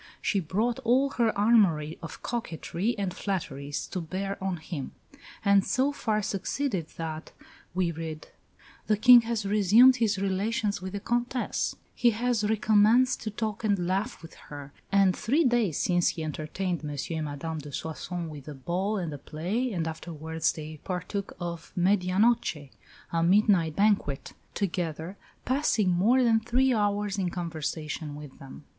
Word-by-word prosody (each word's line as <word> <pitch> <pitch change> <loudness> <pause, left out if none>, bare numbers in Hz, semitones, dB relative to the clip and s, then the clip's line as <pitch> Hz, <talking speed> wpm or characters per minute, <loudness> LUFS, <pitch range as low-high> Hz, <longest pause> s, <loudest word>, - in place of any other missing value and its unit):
She 200 - 0
brought 210 +8 -1
all 260 +4 +2
her 235 -4 +2
armoury 195 -8 +3
of 165 - -9
coquetry 225 -1 -3
and 195 -3 -2
flatteries 145 -8 -3
to 185 - -3
bear 190 +4 -4
on 190 -2 -1
him, 155 -3 -6 0.5
and 200 -1 +5
so 275 +5 +1
far 215 -6 -1
succeeded 195 - -2
that, 160 -1 -5 0.4
we 180 -2 +1
read, 160 -1 -7 0.6
"the 215 - +3
King 245 +2 +9
has 225 -2 -2
resumed 215 +6 +6
his 220 -4 +1
relations 200 +1 -1
with 190 +1 -6
the 200 - -2
Comtesse; 240 +3 -1 0.2
he 240 - +3
has 240 -2 +1
recommenced 220 +4 +3
to 220 - -3
talk 215 +1 -4
and 200 -5 +1
laugh 195 +4 -2
with 165 - -11 0.2
her; 145 -1 -9 0.2
and 195 -2 +4
three 285 +10 +2
days 240 - +2
since 175 -1 +2
he 160 - -1
entertained 155 +4 -3
M. 150 - -4
and 155 +2 -3
Madame 155 +2 -4
de 145 0 -9
Soissons 165 +4 -5
with 145 -2 -10
a 150 - -7
ball 185 +10 -2
and 170 -5 -3
a 145 - -7
play, 190 - -2
and 170 -5 -2
afterwards 160 0 -2
they 155 -1 -8
partook 195 +2 -4
of 170 -2 -6
medianoche 185 - +2 0.4
(a 165 - +1
midnight 175 -3 +3
banquet) 200 -9 +1 0.2
together, 175 -2 -3 0.3
passing 250 -7 +2
more 225 +9 +4
than 225 -2 +4
three 250 +3 +2
hours 205 -2 0
in 185 -2 0
conversation 160 -3 -4
with 145 -2 -11
them." 135 +2 -11
190 Hz, 155 wpm, -28 LUFS, 160-220 Hz, 0.6 s, King